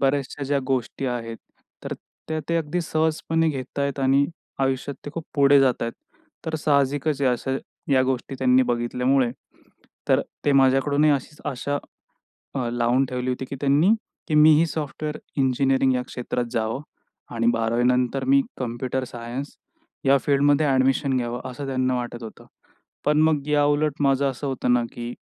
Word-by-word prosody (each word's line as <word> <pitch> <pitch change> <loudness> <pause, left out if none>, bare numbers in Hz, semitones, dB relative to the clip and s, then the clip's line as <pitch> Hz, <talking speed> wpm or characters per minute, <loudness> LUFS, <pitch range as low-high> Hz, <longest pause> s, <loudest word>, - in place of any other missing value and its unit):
बऱ्याचशा 140 +1 0
ज्या 140 +1 +1
गोष्टी 130 0 -2
आहेत, 115 -2 -3 0.5
तर - - -4 0.4
त्या 160 0 -1
ते 170 - +1
अगदी 165 +2 -1
सहजपणे 160 0 0
घेतायतं 140 0 -3
आणि 135 +1 +4 0.4
आयुष्यात 135 +1 -1
ते - - -4
खूप 165 - -5
पुढे 140 -1 +6
जातायतं. 120 -3 0 0.5
तर 160 - -2
साहजिकचायं 140 -1 +1
अशा 130 +2 -2 0.4
या 130 - +5
गोष्टी 130 +1 -2
त्यांनी 130 0 +4
बघितल्यामुळे 125 +1 +1 0.8
तर - - +4 0.2
ते 145 - +3
माझ्याकडूनही 135 +2 +4
अशीच 145 +1 -2
अशा 145 +1 -2 0.8
अ, 130 -3 -1
लावून 120 +2 +2
ठेवली 125 0 -3
होती, 125 +1 -3
की 135 +1 -7
त्यांनी 145 +6 +4 0.4
की 155 - 0
मी 150 +1 +7
ही 165 - +3
सॉफ्टवेअर 150 -1 -4 0.2
इंजिनिअरिंग 135 0 +2
या 125 - 0
क्षेत्रात 125 0 -3
जावं 110 +3 -1 0.5
आणि 115 0 0
12वी 115 +1 0
नंतर 125 +1 +1
मी 135 +1 +5 0.2
कंम्प्युटर 130 +1 -2
सायन्स 120 +3 -6 0.6
या 135 +1 +5
फील्डमध्ये 145 +1 +3
ॲडमिशन 135 0 +2
घ्यावं, 120 -1 -2
असं 135 +3 -6
त्यांना 130 -1 0
वाटत 120 -1 -5
होतं. 110 - -10 0.6
पण 150 +1 +3
मग 155 -3 +2
याउलट 145 0 +2
माझं 140 0 +3
असं 135 +2 -6
होतं 130 -2 0
ना, 120 -1 +3
की 120 0 -6
135 Hz, 150 wpm, -24 LUFS, 125-145 Hz, 0.8 s, मी